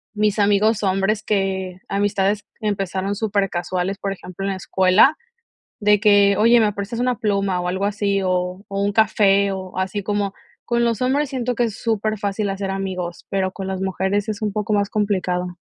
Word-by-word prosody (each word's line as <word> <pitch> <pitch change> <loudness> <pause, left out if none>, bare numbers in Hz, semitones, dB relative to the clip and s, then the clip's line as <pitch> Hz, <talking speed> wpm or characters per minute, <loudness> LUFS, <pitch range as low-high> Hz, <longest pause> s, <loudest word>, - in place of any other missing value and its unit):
mis 210 0 +1
amigos 210 +1 +3
hombres 195 +3 +1
que, 190 -2 -1
amistades 200 0 0 0.2
que 215 - -3
empezaron 195 0 -2
supercasuales, 195 -2 -1
por 195 - -3
ejemplo, 190 0 -8
en 195 - 0
la 190 - -3
escuela, 190 - +4 0.6
de 210 -1 +4
que: 205 -2 +5
"Oye, 235 +2 +5
¿me 210 -2 +2
prestas 205 +4 -5
una 250 -2 +1
pluma?", 200 -3 0
o 180 - -2
algo 190 +2 -1
así, 200 -1 0
o 180 +1 -1
o 195 0 -3
un 205 - +1
café, 200 -2 +3
o 190 -1 -6
así 190 +2 -2
como 205 0 -1 0.3
con 235 0 +1
los 230 -1 0
hombres 275 +3 +1
siento 250 -3 -2
que 240 - +1
es 220 -3 -3
superfacil 215 -2 -1
hacer 195 0 -4
amigos, 185 -3 -4
pero 190 -1 0
con 195 0 -6
las 190 0 -3
mujeres 190 +2 -1
es 215 +1 -4
un 210 - 0
poco 210 +1 -2
más 200 -1 +1
complicado. 180 -4 -1
200 Hz, 185 wpm, -21 LUFS, 190-215 Hz, 0.6 s, que